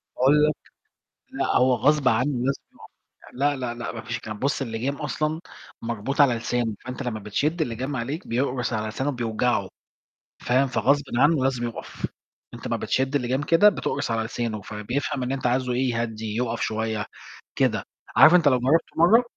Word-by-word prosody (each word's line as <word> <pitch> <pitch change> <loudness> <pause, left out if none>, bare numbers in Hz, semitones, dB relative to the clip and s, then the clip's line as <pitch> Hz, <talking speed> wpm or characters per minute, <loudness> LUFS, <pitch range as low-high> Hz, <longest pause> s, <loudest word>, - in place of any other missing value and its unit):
باقول 145 +4 +4
لك 150 - +1 0.7
لأ، - - -1
هو 125 0 +4
غصب 135 +3 +2
عنُّه 125 +5 +2
لازم 140 - -1
يُقَف. - - -16 0.4
لأ، 145 +3 +1
لأ، 125 -3 -3
لأ، 120 0 -5
ما 115 - -7
فيش - - -4
الكلام 110 -1 -7
ده، - - -17
بُصّ 140 - 0
الِلجام 125 +3 -2
أصلًا 155 +2 -2 0.4
مربوط 120 +5 -1
على 135 -4 +5
لسانُه، 115 -1 -1
فأنت 125 -1 -5
لمّا 115 -3 -3
بتشِدّ 145 - -1
الِلجام 130 +1 -2
عليك 140 +9 -4
بيقرُص 125 0 -1
على 110 0 -1
لسانُه 130 +6 -2
بيوجعُه، 115 -4 0 0.7
فاهم؟ 130 +3 +2
فغصبٍ 140 +2 +2
عنُّه 145 +1 +4
لازم 130 -3 0
يُقَف، 115 - -6 0.5
أنت - - -8
امّا - - 0
بتشِدّ 135 +2 0
الِلجام 130 +1 0
كده 170 +7 +6
بتقرُص 145 - -1
على 115 0 0
لسانُه، 115 -2 -3
فبيفهم 120 +7 -3
إن 125 +2 -2
أنت 130 -2 -2
عايزُه 125 +1 +1
إيه، 125 +1 +1
يهدّي، 110 -2 -3
يُقَف 120 -1 -1
شوية، 110 -1 -2 0.5
كده، - - +1 0.3
عارف 165 - +8
أنت 170 -4 +5
لو 130 -3 +4
جربته 145 +7 +2
مرّه، 210 +9 +6
125 Hz, 175 wpm, -25 LUFS, 115-140 Hz, 0.7 s, عارف